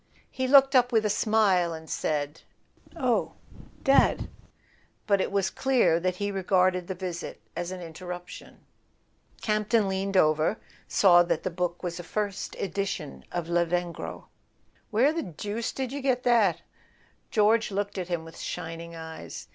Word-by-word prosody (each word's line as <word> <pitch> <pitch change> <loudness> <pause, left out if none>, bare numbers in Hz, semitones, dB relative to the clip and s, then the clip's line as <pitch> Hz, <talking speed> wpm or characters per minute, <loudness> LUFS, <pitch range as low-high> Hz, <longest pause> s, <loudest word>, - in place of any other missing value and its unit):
He 260 0 -2
looked 270 0 +6
up 250 0 +5
with 220 -2 +3
a 210 - +2
smile, 195 -7 +2
and 160 0 -10
said: 150 -1 -2 0.5
"Oh, - - 0 0.5
Dad. 275 0 +4 0.8
.but 200 -2 +3
it - - -2
was 195 -1 +1
clear 255 -11 +2
that 180 +1 -1
he 205 +2 -2
regarded 185 -2 +2
the 190 - -4
visit 180 -2 -5 0.2
as 175 0 -3
an 185 -1 -6
interruption. 175 +2 -9 0.8
Camp 215 -1 0
ton, 225 -4 +3
leaning 195 0 -1
over, 155 +4 +3 0.3
saw 175 -3 +6
that 175 - 0
the 185 - -2
book 175 +1 -3
was 175 0 -3
a - - -6
first 205 +1 -3
edition 195 -5 -4
of 175 -2 -3
Lavengro. 175 0 -1 0.6
"Where 250 +8 +3
the 330 - -1
deuce 205 +6 -4
did 260 -2 -4
you 285 +1 -4
get 260 -2 +1
that?" 225 -8 +3 0.7
George 225 0 +3
looked 200 0 -3
at 180 - -4
him 170 -2 -3
with 165 - -12
shining 165 +1 -6
eyes. 160 0 -8
190 Hz, 155 wpm, -27 LUFS, 175-215 Hz, 0.8 s, looked